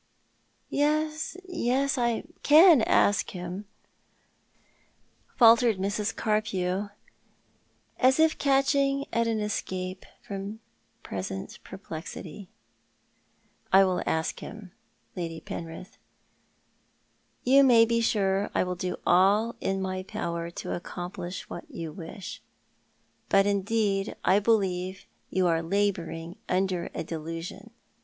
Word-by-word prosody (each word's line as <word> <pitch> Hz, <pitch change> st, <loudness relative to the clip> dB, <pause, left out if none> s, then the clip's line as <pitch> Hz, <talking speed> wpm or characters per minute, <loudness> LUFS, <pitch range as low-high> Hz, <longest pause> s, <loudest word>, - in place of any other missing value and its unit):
" -, -, -42 dB, 0.3 s
Yes, 305 Hz, +3 st, 0 dB
yes, 275 Hz, -5 st, 0 dB
I 235 Hz, -3 st, 0 dB, 0.2 s
can 310 Hz, -1 st, +7 dB
ask 205 Hz, -2 st, +3 dB
him," 180 Hz, +2 st, -6 dB, 1.7 s
faltered 230 Hz, -2 st, +6 dB
Mrs. 205 Hz, +2 st, -2 dB
Carpew, 200 Hz, -2 st, -1 dB, 1.1 s
as 260 Hz, +3 st, +4 dB
if 320 Hz, 0 st, +3 dB
catch 275 Hz, 0 st, +3 dB
ing 275 Hz, 0 st, +1 dB
at 230 Hz, 0 st, +2 dB
an 225 Hz, -1 st, 0 dB
escape 185 Hz, -3 st, -4 dB, 0.2 s
from 200 Hz, +2 st, -6 dB, 0.4 s
present 95 Hz, 0 st, -5 dB
perplexity. 185 Hz, 0 st, -8 dB, 1.2 s
"I 195 Hz, +1 st, +7 dB
will 185 Hz, -2 st, +1 dB
ask 160 Hz, +1 st, -1 dB
him, 210 Hz, -4 st, -9 dB, 0.4 s
Lady 165 Hz, -2 st, -4 dB
Penrith. 170 Hz, +5 st, -8 dB, 1.4 s
You 275 Hz, +2 st, +6 dB
may 235 Hz, -4 st, +7 dB
be 230 Hz, 0 st, +1 dB
sure 200 Hz, -2 st, +1 dB
I -, -, +3 dB
will 180 Hz, 0 st, -2 dB
do 180 Hz, 0 st, -3 dB
all 200 Hz, +6 st, +4 dB
in 195 Hz, 0 st, -1 dB
my 185 Hz, 0 st, -3 dB
power 170 Hz, -4 st, -4 dB
to 170 Hz, -, -5 dB
accomplish 175 Hz, +1 st, -6 dB
what 175 Hz, -, -8 dB
you 165 Hz, -2 st, -6 dB
wish. 195 Hz, +8 st, -8 dB, 0.9 s
Bat, 195 Hz, 0 st, +5 dB
indeed, 200 Hz, 0 st, 0 dB
I 190 Hz, +2 st, +5 dB
believe 190 Hz, -4 st, 0 dB, 0.2 s
you 185 Hz, 0 st, +1 dB
are 165 Hz, -2 st, +2 dB
labouring 170 Hz, -2 st, -2 dB
under 185 Hz, -1 st, 0 dB
a -, -, -2 dB
delusion. 165 Hz, +1 st, -6 dB
195 Hz, 110 wpm, -27 LUFS, 180-230 Hz, 1.7 s, can